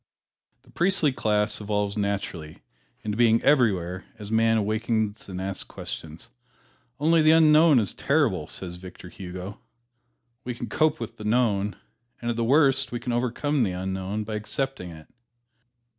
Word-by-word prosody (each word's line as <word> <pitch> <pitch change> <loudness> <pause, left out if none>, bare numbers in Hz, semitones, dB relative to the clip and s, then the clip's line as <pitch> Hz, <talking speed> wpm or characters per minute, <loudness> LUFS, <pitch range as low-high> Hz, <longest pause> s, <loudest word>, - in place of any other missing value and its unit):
The - - -21
priestly 175 -4 +3
class 105 -4 0
evolves 105 -1 -1
naturally 100 -6 -4 0.4
into 105 -1 -2
being 115 -1 +4
everywhere 95 - +2
as 105 -1 -8
man 115 0 +3
awakens 110 0 -1
and 90 -1 -5
asks 95 0 -4
questions. 80 +7 -8 0.7
"Only 160 +2 +4
the 155 - +5
Unknown 155 -1 +6
is 105 -6 +1
terrible," - - +1
says 90 -2 -7
Victor 90 0 -11
Hugo. 90 +2 -8 0.8
We 125 -1 -4
can 120 -1 -6
cope 155 +6 +1
with 115 - -7
the 105 - -9
known, 105 -3 +1 0.4
and 120 0 -2
at - - -3
the 115 - -1
worst 135 0 +3
we 120 - -3
can 120 0 -3
overcome 125 +4 0
the 100 -6 +1
unknown 95 +3 -3
by 110 +1 -6
accepting 110 -1 -3
it. 80 -2 -12
110 Hz, 150 wpm, -25 LUFS, 95-125 Hz, 0.8 s, Unknown